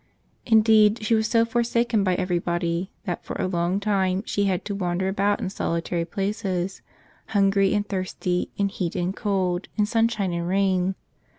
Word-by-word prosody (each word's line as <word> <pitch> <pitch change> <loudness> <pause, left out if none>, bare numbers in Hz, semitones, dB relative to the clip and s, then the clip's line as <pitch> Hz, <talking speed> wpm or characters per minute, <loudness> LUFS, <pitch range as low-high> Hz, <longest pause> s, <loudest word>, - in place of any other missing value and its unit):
Indeed, 220 -1 +5
she 215 - +1
was 220 -1 +2
so 230 -1 +3
forsaken 235 -1 +1
by 185 -2 +2
everybody 175 0 -1 0.2
that 175 -4 -3
for - - -6
a - - -1
long 180 +1 0
time 195 -2 0
she 205 - 0
had 190 -1 -1
to 205 - -3
wander 185 -1 -1
about 200 +1 +1
in 190 - -3
solitary 170 -2 -2
places, 195 -1 -3 0.5
hungry, 195 -1 +3
and 205 0 0
thirsty, 185 -2 -2
in 200 -1 +1
heat 180 -4 -3
and 180 +1 -1
cold, 190 -3 -1
in 210 - +3
sunshine 220 -4 +1
and 170 0 -2
rain. 190 0 +1
195 Hz, 165 wpm, -24 LUFS, 180-210 Hz, 0.5 s, Indeed